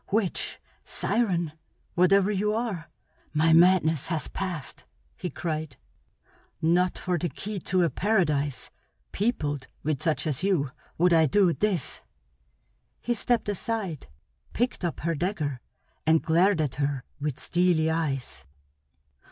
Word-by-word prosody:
Witch, 205 -3 +1 0.2
siren, 175 -9 0 0.4
whatever 190 +3 +4
you 210 +1 0
are, 215 -8 -3 0.5
my 160 +1 +4
madness 165 -3 +5
has 165 -2 -1
passed!" 180 -9 -5 0.3
he 180 - -4
cried. 155 -1 -4 0.8
"Not 175 +3 +2
for 180 -2 -1
the 175 - -1
key 200 +8 -5
to 180 +1 +1
a 170 - +3
paradise 150 - 0 0.4
peopled 150 - -1 0.2
with 150 -2 -1
such 160 0 0
as 150 -5 -1
you 180 -9 +1 0.3
would 175 +1 +4
I 160 -1 +5
do 185 +2 +4
this!" 190 -9 -1 1.0
He 240 - -1
stepped 235 0 0
aside, 205 - -3 0.5
picked 245 -4 -1
up 175 - -2
her 165 +1 0
dagger, 155 -5 -2 0.5
and 160 0 +6
glared 175 +2 +3
at 140 -4 -1
her 140 -2 -1 0.2
with 145 -2 -3
steely 170 -3 +2
eyes. 135 - -3
170 Hz, 125 wpm, -27 LUFS, 155-195 Hz, 1.0 s, and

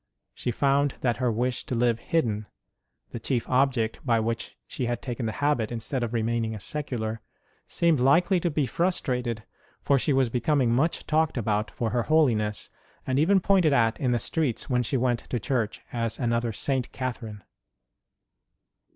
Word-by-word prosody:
She - - -4
found 140 +3 +2
that 120 -2 +1
her 125 -2 +1
wish 120 +3 -1
to 125 - -2
live 120 -1 +2
hidden 110 -8 -1 0.6
the 120 - -5
chief 120 +1 -1
object 125 -4 +1
with 115 -4 +2
which 115 0 -3
she 125 - -3
had 120 0 -1
taken 120 -2 -4
the - - -1
habit 135 -7 +1
instead 120 +3 -2
of 120 -2 -2
remaining 115 -1 -1
a - - -7
secular 115 -2 -3 0.5
seemed 165 -4 +2
likely 175 +8 +4
to 175 - 0
be 150 -2 0
frus 175 +9 +1
trated, 120 -4 -2 0.4
for 140 -1 +3
she 150 - 0
was 135 -3 +3
becoming 125 +1 +1
much 150 +7 +1
talked 155 -1 +1
about 105 -2 0
for 115 -2 -3
her 120 - +1
holiness, 115 -8 +2 0.4
and 130 +1 +1
even 190 +6 +4
pointed 185 -5 +3
at 115 -3 +2
in 130 - 0
the 120 - +2
streets 140 0 -2
when 125 0 +3
she 120 +3 0
went 120 -1 +1
to 120 - -4
church 110 +1 -1
as 115 -2 -1
another 120 -2 0
St. 130 +3 -2
Catherine. 115 -6 -5
125 Hz, 175 wpm, -26 LUFS, 115-140 Hz, 0.6 s, likely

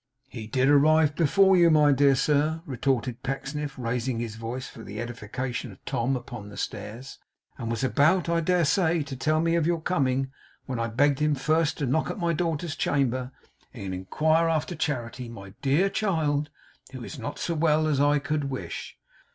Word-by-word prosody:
'He 115 -4 -7
did 130 +4 +1
arrive 145 +1 +4
before 190 +4 +4
you, 170 -2 +6
my 150 -2 +5
dear 140 0 +4
sir,' 150 +4 +1
retorted 130 -3 -1
Pecksniff, 135 +2 -4
raising 125 0 -2
his 115 -2 -4
voice 115 +3 -5
for 115 - -11
the 105 -1 -7
edification 120 +1 -4
of 95 - -17
Tom 120 +3 0
upon 120 -4 -7
the 100 - -11
stairs, 115 +6 -6 0.4
'and 115 -3 -4
was 115 +3 -2
about, 155 +7 +3
I 170 0 +2
dare 175 +1 +2
say, 160 +1 +2
to 140 -1 -7
tell 155 +4 +1
me 165 0 +1
of 170 -2 +2
your 170 -1 +1
coming, 135 -6 0 0.3
when 130 -3 -4
I 115 - 0
begged 135 +5 +2
him 150 -1 +2
first 155 +3 +1
to 145 - -1
knock 135 +5 0
at - - -4
my 170 -3 0
daughters' 165 -1 -2
chamber, 130 -2 0 0.4
and 100 -5 -5
inquire 155 - +1
after 160 +2 -1
Charity, 130 -6 -3
my 100 -4 -10
dear 145 +8 +3
child, 155 -8 0 0.4
who 130 -3 -8
is 140 - -8
not 145 +5 -5
so 170 - -2
well 155 -1 +2
as 150 -3 +1
I 145 +1 +4
could 150 0 -2
wish. 135 -1 -6
140 Hz, 185 wpm, -26 LUFS, 125-155 Hz, 0.4 s, you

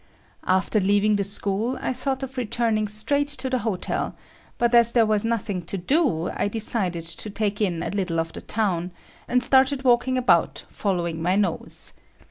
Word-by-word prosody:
After 190 +3 +2
leaving 205 +2 +3
the 200 - 0
school, 205 +5 0
I - - -2
thought 265 +1 -3
of 265 0 -6
returning 225 -3 0
straight 230 +8 0
to 260 0 -3
the 255 - +1
hotel, 210 -5 -2 0.4
but 240 0 +1
as 235 -1 +5
there 230 -2 +5
was 215 -1 +1
nothing 225 -5 -2
to 195 - -3
do, 205 - +1
I - - -1
decided 200 -6 0
to 170 +6 -5
take 205 0 -2
in 175 -5 0
a - - -3
little 185 -5 -1
of 165 0 -3
the - - -7
town, 185 -5 -1 0.3
and 250 0 +2
started 265 +1 +3
walking 255 +1 +3
about 180 -10 +2
following 170 -5 -2
my 180 +3 +1
nose. 195 -5 -1
215 Hz, 175 wpm, -24 LUFS, 185-245 Hz, 0.4 s, as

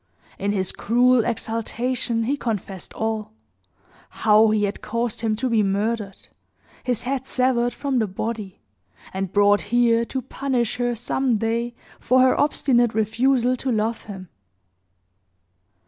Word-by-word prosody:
In 200 +1 0
his 190 -3 0
cruel 245 +1 +3
exultation, 230 +1 -2
he 265 +5 0
confessed 205 -7 -4
all; 220 - -3 0.8
how 215 0 +4
he 215 -1 +1
had 205 0 -2
caused 230 0 -2
him 220 -2 0
to 255 +4 -2
be 230 -3 +2
murdered; 205 0 -2 0.6
his 245 -3 -1
head 265 +1 -3
severed 250 -2 +1
from 270 +1 -1
the 220 - +1
body; 205 0 -5 0.5
and 190 -1 -3
brought 205 0 +4
here 235 0 +3
to 260 +1 -4
punish 250 -3 -2
her, 245 -1 0
some 245 +2 0
day, 230 +2 -1 0.2
for 255 +2 +3
her 260 0 +5
obstinate 240 -6 +2
refusal 245 +3 +2
to 260 +1 -2
love 220 0 -1
him. 190 -4 -9
230 Hz, 135 wpm, -23 LUFS, 215-245 Hz, 0.8 s, her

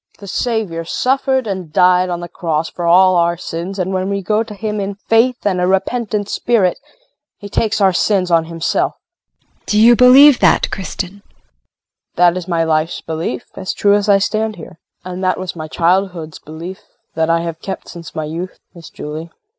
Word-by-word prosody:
The 200 - -12
Savior 200 -5 -2
suffered 260 - 0
and 185 -6 -5
died 180 +2 +4
on 175 -1 -3
the 175 - -6
cross 165 -2 -2
for 175 -1 -4
all 185 +2 +5
our 170 0 +2
sins, 175 +4 -6
and 185 0 -2
when 185 +1 -1
we 200 -1 -2
go 215 +3 +1
to 220 -2 -6
Him 210 +1 -3
in 200 0 -3
faith 225 +4 +1
and 185 -3 +1
a 180 - +2
repentant 205 +2 -1
spirit 205 -5 +1 0.6
he 205 - -9
takes 215 +1 0
our 190 -2 +4
sins 185 0 +1
on 165 -1 +3
Himself. 165 0 -1
JULIE. - - -45
Do 210 - +2
you 235 +2 +7
believe 260 +3 +7
that, - - +3
Kristin? 195 +1 -5
KRISTIN. - - -44 0.9
That 175 0 +4
is 185 -1 -5
my 170 -2 +1
life's 160 +1 0
belief, 160 -6 -4
as 190 -1 -4
true 200 0 +3
as 205 0 +1
I 200 - +6
stand 215 +2 -1
here. 165 0 -12 0.3
And 185 +1 -6
that 185 0 +1
was 185 -1 -5
my 155 -1 -6
childhood's 170 -1 -1
belief 170 +5 -9 0.3
that 160 0 0
I 165 0 +2
have 165 -1 -5
kept 190 -2 -6
since 170 -2 -10
my 155 - -3
youth, 170 +4 -6 0.2
Miss 170 -3 -12
Julie. 155 +3 -7
185 Hz, 195 wpm, -17 LUFS, 170-205 Hz, 0.9 s, you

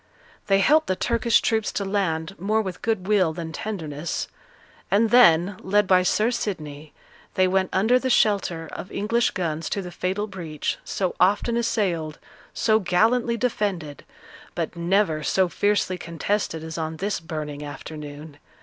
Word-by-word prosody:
They 195 -1 +4
helped 310 +8 +4
the 185 - +1
Turkish 235 +2 +2
troops 220 -2 0
to 200 - -2
land 185 -4 -1
more 210 +4 +1
with 190 -4 -4
good 220 -5 -1
will 190 -6 +3
than 165 -1 -6
tenderness; 160 -6 -4 0.6
and 215 +3 +3
then, 185 -5 +5
led 205 +2 +2
by 185 -1 +4
Sir 215 +5 +2
Sidney, 155 -10 -5 0.4
they 185 0 +4
went 190 0 +1
under 220 +7 +3
the 260 - -2
shelter 195 -8 +2
of - - -8
English 230 +3 +1
guns 165 -3 -3
to - - -2
the 180 - -7
fatal 190 +4 -2
breach, 170 -7 -4
so 185 -2 -2
often 205 +5 +3
assailed, 185 -10 -1 0.3
so 220 -1 +2
gallantly 225 +6 +2
defended, 195 - -2 0.5
but - - -3
never 170 -2 +1
so 190 +4 +2
fiercely 200 -1 0
contested 170 0 -2
as 160 0 -6
on 160 0 -3
this 200 +4 -2
burning 150 -3 -6
afternoon. 145 +1 -9
185 Hz, 150 wpm, -24 LUFS, 160-210 Hz, 0.6 s, then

